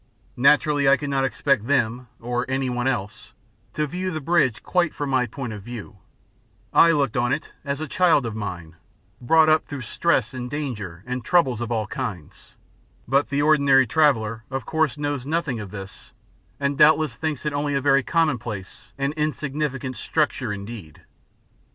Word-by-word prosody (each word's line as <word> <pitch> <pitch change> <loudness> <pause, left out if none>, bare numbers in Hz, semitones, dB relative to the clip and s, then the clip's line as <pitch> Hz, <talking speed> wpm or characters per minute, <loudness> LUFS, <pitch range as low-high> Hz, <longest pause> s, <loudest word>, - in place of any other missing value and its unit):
Naturally 140 +2 +4
I 140 - +6
could 145 -1 -4
not 135 -1 +1
expect 135 -3 0
them, 125 -3 0
or 120 +1 -2
anyone 130 -2 -1
else, 110 -4 -3 0.4
to 150 - 0
view 180 +5 -3
the 160 -3 -3
bridge 150 -6 +1
quite 180 -3 0
from 145 -2 -3
my 130 -2 +2
point 120 0 -6
of 105 - -8
view; 110 -1 -9 0.8
I 170 - +7
looked 145 -7 +1
on 120 0 +1
it 150 +3 -2
as 140 -1 -3
a 155 - -4
child 165 -6 +3
of 110 -2 -4
mine, 90 -6 -6 0.4
brought 160 +6 +5
up 155 0 +3
through 140 -2 -6
stress 125 -1 0
and 125 -1 -5
danger 105 - -5
and 125 0 -4
troubles 130 -8 +2
of 120 0 -4
all 110 -2 0
kinds, 110 - -7 0.5
but 140 +4 +2
the 145 +1 0
ordinary 140 -3 +5
traveller 115 -6 +1
of 135 -3 -4
course 160 -3 0
knows 145 -3 -3
nothing 150 -6 -1
of 105 -2 -7
this 95 +3 -10 0.5
and 140 0 -1
doubtless 155 -3 +5
thinks 155 -2 -3
it 150 - -1
only 145 0 -1
a - - +2
very 140 0 +3
commonplace 125 - -2
and 140 +1 -1
insignificant 145 -3 -2
structure 140 -7 -1
indeed. 100 -5 -8
135 Hz, 170 wpm, -23 LUFS, 120-150 Hz, 0.8 s, I